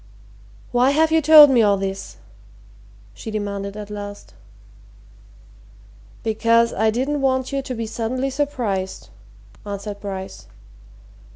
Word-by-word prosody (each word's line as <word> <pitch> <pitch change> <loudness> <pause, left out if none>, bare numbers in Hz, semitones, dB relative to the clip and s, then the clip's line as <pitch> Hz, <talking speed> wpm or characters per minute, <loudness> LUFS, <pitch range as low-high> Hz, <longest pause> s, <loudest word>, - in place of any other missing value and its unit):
"Why 245 +2 +3
have 315 +3 +2
you 320 0 +3
told 300 -1 +9
me 245 -3 +4
all 205 -2 +3
this?" 195 0 -5 1.0
she 225 - -9
demanded 200 -1 -4
at 210 0 -8
last. 205 0 -8 1.9
"Because 230 +1 +2
I 220 +2 +1
didn't 270 +6 -1
want 260 -1 0
you 275 0 -1
to 260 -1 -6
be 230 0 -4
suddenly 245 +4 -3
surprised," 240 -10 -3 0.5
answered 205 0 -6
Bryce. 190 -2 -7
225 Hz, 115 wpm, -21 LUFS, 205-265 Hz, 1.9 s, told